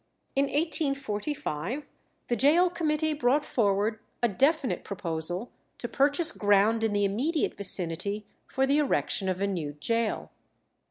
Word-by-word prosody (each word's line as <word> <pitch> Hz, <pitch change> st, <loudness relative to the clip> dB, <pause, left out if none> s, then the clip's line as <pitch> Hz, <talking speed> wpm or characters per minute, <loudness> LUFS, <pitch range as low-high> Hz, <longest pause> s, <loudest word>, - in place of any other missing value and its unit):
In 275 Hz, +1 st, +3 dB
1845 275 Hz, -, -2 dB, 0.4 s
the 240 Hz, -, 0 dB
Gaol 320 Hz, +9 st, +4 dB
Committee 315 Hz, -2 st, 0 dB
brought 290 Hz, +1 st, +1 dB
forward 210 Hz, 0 st, 0 dB, 0.2 s
a -, -, +5 dB
definite 275 Hz, -, +1 dB
proposal 175 Hz, +2 st, -4 dB, 0.3 s
to 240 Hz, -, -5 dB
purchase 290 Hz, +6 st, +2 dB
ground 205 Hz, +2 st, +2 dB
in 225 Hz, -, +1 dB
the 205 Hz, 0 st, +1 dB
immediate 270 Hz, -, -1 dB
vicinity 200 Hz, +2 st, +2 dB, 0.2 s
for 265 Hz, -, 0 dB
the 280 Hz, +2 st, +2 dB
erection 215 Hz, -8 st, 0 dB
of 185 Hz, +1 st, -2 dB
a -, -, +2 dB
new 170 Hz, -7 st, -3 dB
gaol. 230 Hz, -1 st, -1 dB
230 Hz, 130 wpm, -27 LUFS, 200-290 Hz, 0.4 s, a